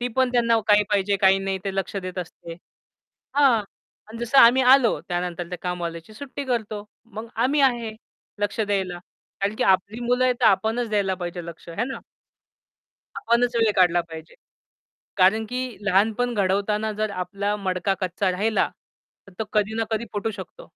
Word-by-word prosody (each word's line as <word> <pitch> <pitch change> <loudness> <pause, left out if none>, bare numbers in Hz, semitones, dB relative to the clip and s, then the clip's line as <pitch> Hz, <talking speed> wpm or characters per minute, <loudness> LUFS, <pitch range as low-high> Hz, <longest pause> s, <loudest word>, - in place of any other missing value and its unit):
ती 245 - -1
पण 260 -1 +2
त्यांना 230 -2 +3
काही 210 0 +6
पाहिजे, 200 0 +2
काही 190 0 +4
नाही 195 0 -2
ते 195 -1 -3
लक्ष 195 +1 -2
देत 185 -1 -5
असते. 170 -1 -7 0.8
हां. 265 -7 +4 0.5
अन 225 +1 -9
जसं 240 +3 +2
आम्ही 255 +2 +7
आलो 255 -2 +5
त्यानंतर 175 -1 -3
त्या 180 - -6
कामवालीची 175 +2 -5
सुट्टी 280 +3 -7
करतो. 220 -5 -3 0.2
मग 225 0 -9
आम्ही 265 +6 +2
आहे 235 -4 +1 0.5
लक्ष 205 +2 -1
द्यायला. 195 -4 -1 0.4
कारण 200 +2 0
की - - 0
आपली 195 +4 +1
मुलं 250 +1 +2
आहेत, 250 -1 +3
तर 235 - +5
आपणच 220 +5 +2
द्यायला 200 -3 +1
पाहिजे 175 -1 -6
लक्ष 170 0 -11
है 205 +8 -2
ना? 265 - -5 1.2
आपणच 240 +2 +1
वेळ 225 -2 +3
काढला 175 -2 +4
पाहिजे. 160 0 -10 0.8
कारण 205 +4 +4
की 250 +1 -2 0.2
लहानपण 220 +5 +2
घडवताना 205 +2 0
जर 215 0 -2
आपला 200 +3 -2
मडका 185 +1 0
कच्चा 185 +1 0
राहिला, 215 +4 +1 0.6
तर 195 - -15
तो - - +1
कधी 210 0 +1
ना 225 - 0
कधी 220 +1 -1
फुटू 215 +2 -2
शकतो. 185 - -10
210 Hz, 170 wpm, -24 LUFS, 190-235 Hz, 1.2 s, आम्ही